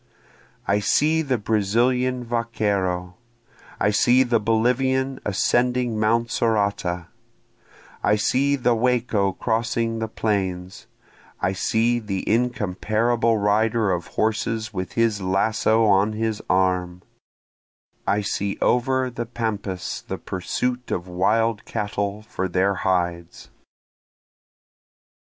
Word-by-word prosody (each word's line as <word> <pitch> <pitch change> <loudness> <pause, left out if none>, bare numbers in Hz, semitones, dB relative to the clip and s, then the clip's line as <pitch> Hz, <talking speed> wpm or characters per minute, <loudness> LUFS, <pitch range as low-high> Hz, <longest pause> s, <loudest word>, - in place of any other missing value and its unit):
I 100 +1 +2
see 155 +9 +2
the 135 -5 0
Brazilian 120 +5 +1
vaquero, 100 -6 -1 0.6
I 105 - +2
see 125 +5 +4
the 120 -2 +1
Bolivian 130 +4 +1
ascending 120 +3 +1
mount 115 +2 +1
Sorata, 100 -6 0 1.0
I 105 - +3
see 135 +6 +2
the 125 -3 +2
Wacho 115 -5 +1
crossing 115 0 -1
the 110 - -2
plains, 95 -4 -3 0.5
I 90 +2 0
see 115 +5 +1
the 100 -4 -4
incomparable 115 0 +1
rider 110 +1 +2
of 90 -2 -2
horses 110 0 -1
with 90 -1 -4
his 115 -3 +1
lasso 110 +4 +2
on 100 +1 +3
his 110 -1 -2
arm, 90 -1 +1 1.0
I 100 +2 +2
see 100 0 -2
over 130 +1 +1
the 120 -1 -5
pampas 105 -6 -4
the - - -4
pursuit 125 +7 -3
of 90 +1 -3
wild 105 +5 +1
cattle 100 0 -3
for 95 -3 -3
their 95 +2 +1
hides. 85 -3 -2
110 Hz, 105 wpm, -23 LUFS, 95-120 Hz, 1.0 s, see